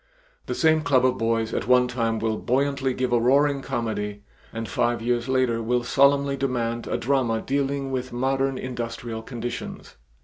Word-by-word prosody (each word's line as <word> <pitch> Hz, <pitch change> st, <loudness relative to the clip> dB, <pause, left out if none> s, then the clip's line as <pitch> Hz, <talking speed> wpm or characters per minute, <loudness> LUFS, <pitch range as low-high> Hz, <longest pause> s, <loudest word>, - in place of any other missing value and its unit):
The -, -, -2 dB
same 160 Hz, -1 st, +3 dB
club 130 Hz, -4 st, +3 dB
of 130 Hz, 0 st, +1 dB
boys 115 Hz, -1 st, 0 dB
at -, -, -2 dB
one 125 Hz, 0 st, +5 dB
time 115 Hz, -2 st, -1 dB
will 110 Hz, 0 st, -1 dB
buoyantly 135 Hz, +1 st, 0 dB
give 125 Hz, -1 st, -1 dB
a 120 Hz, -, +4 dB
roaring 140 Hz, +3 st, +3 dB
comedy 105 Hz, -4 st, -3 dB, 0.3 s
and 115 Hz, 0 st, -5 dB
five 120 Hz, 0 st, 0 dB
years 120 Hz, +2 st, -1 dB
later 130 Hz, -3 st, +1 dB
will 120 Hz, +2 st, 0 dB
solemnly 140 Hz, +2 st, +3 dB
demand 120 Hz, -3 st, -2 dB
a -, -, -1 dB
drama 125 Hz, -3 st, +1 dB
dealing 140 Hz, +1 st, -1 dB
with 130 Hz, -1 st, -3 dB
modern 135 Hz, +2 st, 0 dB
industrial 120 Hz, -2 st, -5 dB
conditions. 120 Hz, -, -6 dB
125 Hz, 165 wpm, -24 LUFS, 115-135 Hz, 0.3 s, one